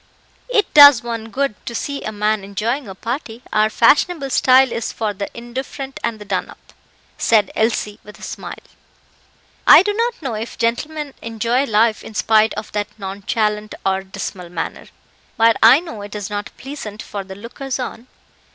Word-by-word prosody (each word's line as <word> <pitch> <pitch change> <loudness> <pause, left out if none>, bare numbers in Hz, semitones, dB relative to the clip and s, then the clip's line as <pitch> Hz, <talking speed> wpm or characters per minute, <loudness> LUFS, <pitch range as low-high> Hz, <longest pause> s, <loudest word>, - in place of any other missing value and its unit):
"It 430 -4 +1
does 285 -5 +9
one 230 -1 -5
good 275 -2 -2
to 235 - -4
see 280 +4 -3
a 215 - -4
man 210 0 0
enjoying 220 +7 -2
a 190 - -8
party; 235 +2 -5
our 215 0 +3
fashionable 280 +5 +3
style 260 0 +5
is 230 - -3
for 215 -2 -2
the 200 0 -5
indifferent 265 +3 -6
and 230 -1 -1
the 210 - -11
done - - -2
up," - - -17 0.5
said 215 -4 +3
Elsie, 215 -2 0
with 210 - -13
a - - -14
smile. - - -7 1.1
"I - - +10
do 415 +1 0
not 470 +2 -1
know 265 -7 -4
if 220 +2 -5
gentlemen 285 +5 -2
enjoy 230 +4 0
life 220 -1 +2
in 220 - -11
spite 220 +1 +3
of 210 0 -6
that 205 0 -2
nonchalant 210 +2 -2
or 190 0 +1
dismal 190 -2 -7
manner; 170 -2 -5 0.5
but 225 0 +5
I 235 +6 +8
know 320 -12 -8
it 205 +1 -8
is 205 0 -5
not 205 0 -4
pleasant 250 -6 -7
for 200 -2 -6
the 190 0 -10
lookers 245 +6 -5
on." 250 -1 -6
225 Hz, 175 wpm, -19 LUFS, 210-265 Hz, 1.1 s, I